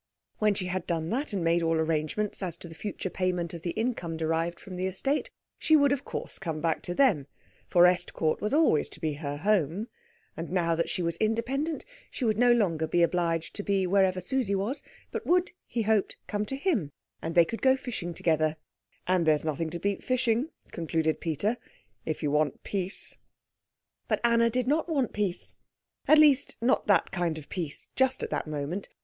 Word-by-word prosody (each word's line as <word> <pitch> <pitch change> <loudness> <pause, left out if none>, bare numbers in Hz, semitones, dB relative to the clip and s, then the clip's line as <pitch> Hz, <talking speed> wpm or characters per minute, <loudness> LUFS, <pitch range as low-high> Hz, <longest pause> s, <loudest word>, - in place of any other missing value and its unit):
When 210 -1 +3
she 190 - -1
had 180 +1 -3
done 165 -1 -1
that, 270 +4 -1
and 195 -4 -1
made 170 +1 +3
all 165 0 +2
arrangements 160 +7 -1
as 180 -3 -3
to - - -8
the 165 - -10
future 190 +1 -5
payment 180 -2 -1
of 170 - -7
the 170 - -3
income 175 -5 -2
derived 165 +2 -1
from 185 - -9
the 185 +1 -1
estate, 270 +10 -1 0.3
she 315 - +4
would 285 -2 +5
of 280 -1 -1
course - - -6
come 165 -5 -3
back 165 0 0
to 175 - -4
them; 190 - +3 0.4
for 175 - +5
Estcourt 175 -3 +1
was 210 - -1
always 295 - +3
to - - -12
be 155 -2 -1
her 145 -1 -4
home, 195 - +1 0.5
and 165 +1 -5
now 175 -2 +1
that 165 +1 0
she 180 - -1
was 170 0 -1
independent 260 +8 -1 0.2
she 255 - -3
would 215 -1 +1
no 245 0 +6
longer 170 -9 +2
be 175 +2 +3
obliged 170 -1 0
to - - -4
be 195 -2 +1
wherever 185 0 +3
Susie 205 +1 0
was, 230 +9 -2 0.3
but - - -5
would, 360 +1 +3 0.2
he 230 - -1
hoped, 215 -2 +1
come 210 0 -2
to 270 - -3
him, 270 - 0 0.3
and 165 +1 -4
they 170 -1 +7
could 230 +6 -5
go 265 0 +5
fishing 235 -10 -5
together, 155 -2 +1 0.5
"and 180 -3 +2
there's 155 0 +3
nothing 160 +1 -1
to 170 - -4
beat 200 +2 -2
fishing," 255 +2 +1 0.2
concluded 160 -1 -1
Peter, 185 - 0 0.5
"if 155 0 -2
you 145 - +1
want 150 -2 +1
peace." 195 -1 -3 0.9
But - - +1
Anna 235 0 +4
did 250 +1 0
not 315 +5 +1
want 275 -7 0
peace; 200 -4 -2 0.5
at 310 - +7
least, 290 -3 +5
not 245 +3 +2
that 200 -5 +3
kind 175 -4 -1
of 150 - -10
peace 165 -6 -5
just 260 0 +2
at - - -4
that - - -2
moment. 155 +6 -4
185 Hz, 200 wpm, -28 LUFS, 165-230 Hz, 0.9 s, they